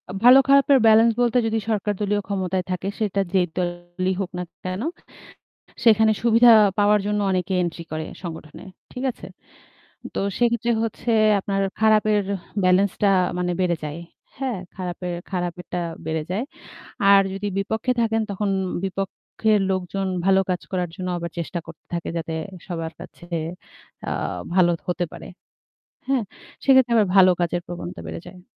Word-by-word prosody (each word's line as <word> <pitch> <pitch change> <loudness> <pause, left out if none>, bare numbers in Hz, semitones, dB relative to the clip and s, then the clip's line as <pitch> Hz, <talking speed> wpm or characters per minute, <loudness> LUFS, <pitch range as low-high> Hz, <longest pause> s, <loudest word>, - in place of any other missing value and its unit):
আ - - -5
ভালো 250 +2 +9
খারাপের 275 0 +6
ব্যালেন্স 225 +1 +6
বলতে 245 0 +2
যদি 225 0 0
সরকারদলীয় 205 -1 0
ক্ষমতায় 190 -2 -1
থাকে 185 +1 -3
সেটা 200 -2 0
যেই 185 -2 +4
দলই 175 +1 -2
হোক 185 - -3
না 180 - -2 0.2
কেন 185 +2 -3 1.0
সেখানে 220 -1 +5
সুবিধা 235 +1 +6 0.3
পাওয়ার 205 0 +4
জন্য 210 0 0
অনেকে 185 +1 -1
এন্ট্রি 170 -1 -4
করে 155 0 -3 0.2
সংগঠনে। 160 -3 -8 0.3
ঠিক 250 +1 -5
আছে? - - -11 0.9
তো - - -2 0.2
সেক্ষেত্রে 235 -1 +1
হচ্ছে 230 +1 -3 0.3
আপনার 195 0 -2 0.2
খারাপের 215 -1 +4 0.4
ব্যালেন্সটা 190 +2 +3 0.3
মানে 180 0 0
বেড়ে 175 -2 +1
যায়। 150 +1 -5 0.4
হ্যাঁ? 260 -6 -2 0.2
খারাপের 180 -1 -4 0.2
খারাপেরটা 180 -1 -3 0.3
বেড়ে 160 0 -1
যায়। 205 +7 -1 0.7
আর 200 0 +8
যদি 195 +1 -4
বিপক্ষে 220 +5 -1
থাকেন 225 -1 +1
তখন 200 +1 -1 0.3
বিপক্ষের 195 +3 -1
লোকজন 190 +1 -2 0.2
ভালো 195 0 +5
কাজ 180 - -1
করার 180 -2 -1
জন্য 185 0 -4
আবার 170 0 -5
চেষ্টা 170 +1 -3
করতে 165 -1 -13
থাকে 170 - -3
যাতে 165 -1 -3 0.3
সবার 165 -2 -4
কাছে - - -12 0.9
আ - - -1 0.4
ভালো 180 -2 +5 0.2
হতে 180 0 0
পারে। - - -9 0.8
হ্যাঁ? 270 -3 +2 0.4
সেক্ষেত্রে 260 -3 +5
আবার 215 -2 +4
ভালো 185 -1 +8
কাজের 175 0 0
প্রবণতা 90 - -7
বেড়ে 80 +1 -6
যায়। 180 - -14
190 Hz, 145 wpm, -23 LUFS, 180-220 Hz, 1.0 s, ভালো